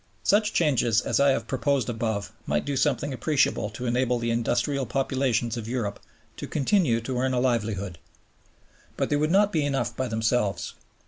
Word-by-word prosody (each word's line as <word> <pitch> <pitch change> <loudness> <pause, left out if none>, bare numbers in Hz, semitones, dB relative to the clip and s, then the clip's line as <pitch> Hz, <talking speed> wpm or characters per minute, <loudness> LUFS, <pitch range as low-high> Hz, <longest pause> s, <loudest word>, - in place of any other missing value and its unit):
Such 210 +1 +3
changes 125 -9 +2
as - - 0
I 140 0 +5
have 115 -4 +1
proposed 130 0 0
above 110 -3 -2 0.2
might 75 +1 0
do 145 - -2
something 135 0 0
appreciable 130 -4 +1
to 110 +4 -7
enable 125 0 +1
the 115 0 -1
industrial 120 +3 0
populations 125 -2 0
of 115 -2 -5
Europe 115 -5 -3 0.4
to - - -6
continue 145 - +2
to 125 +2 -3
earn 130 0 0
a - - +2
livelihood. 105 -8 -1 1.0
But - - -1
they - - +3
would 150 +1 +1
not 200 +3 +3
be 155 -3 +2
enough 135 -5 -1
by 130 +2 -2
themselves. 110 -2 0
125 Hz, 175 wpm, -26 LUFS, 115-140 Hz, 1.0 s, I